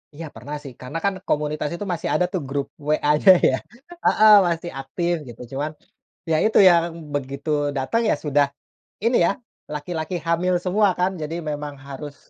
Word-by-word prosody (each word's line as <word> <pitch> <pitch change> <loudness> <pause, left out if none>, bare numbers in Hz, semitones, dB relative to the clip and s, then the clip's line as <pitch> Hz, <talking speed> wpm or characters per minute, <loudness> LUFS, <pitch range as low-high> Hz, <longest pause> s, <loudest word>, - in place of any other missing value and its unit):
Iya 165 +2 -7
pernah 140 +7 -7
sih, 135 -4 -9
karena 130 +6 -5
kan 200 - +2 0.2
komunitas 150 0 -1
itu 205 +4 -5
masih 165 - -3
ada 180 - +2
tuh 185 - -1
grup 140 0 -2 0.2
WA-nya 150 +4 +5 0.2
ya. 130 - +1 0.5
Heeh, 215 0 +6
masih 170 0 -2
aktif 170 +6 -2 0.2
gitu, 120 - -11
cuman 145 +3 -2 0.6
ya 155 - +4
itu 220 - +2
yang 170 -1 +5 0.3
begitu 140 +2 -4 0.3
datang 135 - 0
ya - - +4
sudah 145 0 +3 0.6
ini 235 +2 +3
ya, - - +2 0.4
laki-laki 160 +3 -4
hamil 175 +2 +1
semua 200 +3 +3
kan, 180 +1 +2
jadi 155 +2 -4 0.2
memang 145 -1 -5
harus, 140 +1 -7
155 Hz, 165 wpm, -22 LUFS, 145-180 Hz, 0.6 s, Heeh